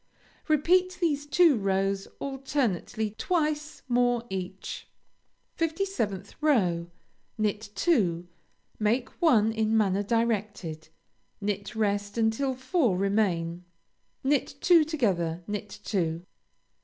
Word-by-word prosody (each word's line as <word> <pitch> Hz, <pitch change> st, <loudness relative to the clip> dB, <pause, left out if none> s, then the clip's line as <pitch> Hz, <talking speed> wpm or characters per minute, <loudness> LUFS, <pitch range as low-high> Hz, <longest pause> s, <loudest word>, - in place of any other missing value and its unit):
Repeat 360 Hz, +4 st, +3 dB
these 295 Hz, -5 st, 0 dB
two 335 Hz, -2 st, +5 dB
rows 195 Hz, -1 st, 0 dB
alternately 255 Hz, -, -2 dB
twice 305 Hz, -3 st, -1 dB
more 245 Hz, -1 st, +2 dB
each. 190 Hz, 0 st, -5 dB, 0.7 s
57th 320 Hz, -, -2 dB
row 180 Hz, -, +2 dB, 0.5 s
Knit 210 Hz, 0 st, -1 dB
two; 190 Hz, -, +1 dB, 0.5 s
make 225 Hz, +4 st, +1 dB
one 225 Hz, -10 st, +5 dB
in 220 Hz, 0 st, +1 dB
manner 200 Hz, -2 st, +2 dB
directed; 205 Hz, -7 st, -1 dB, 0.5 s
knit 205 Hz, +2 st, -3 dB
rest 205 Hz, -1 st, -1 dB
until 230 Hz, +4 st, +1 dB
four 260 Hz, -, +1 dB
remain; 180 Hz, -4 st, 0 dB, 0.6 s
knit 275 Hz, 0 st, +1 dB
two 340 Hz, -1 st, +6 dB
together; 185 Hz, -, -1 dB
knit 210 Hz, 0 st, -4 dB
two. 170 Hz, -4 st, -1 dB
220 Hz, 95 wpm, -28 LUFS, 195-280 Hz, 0.7 s, two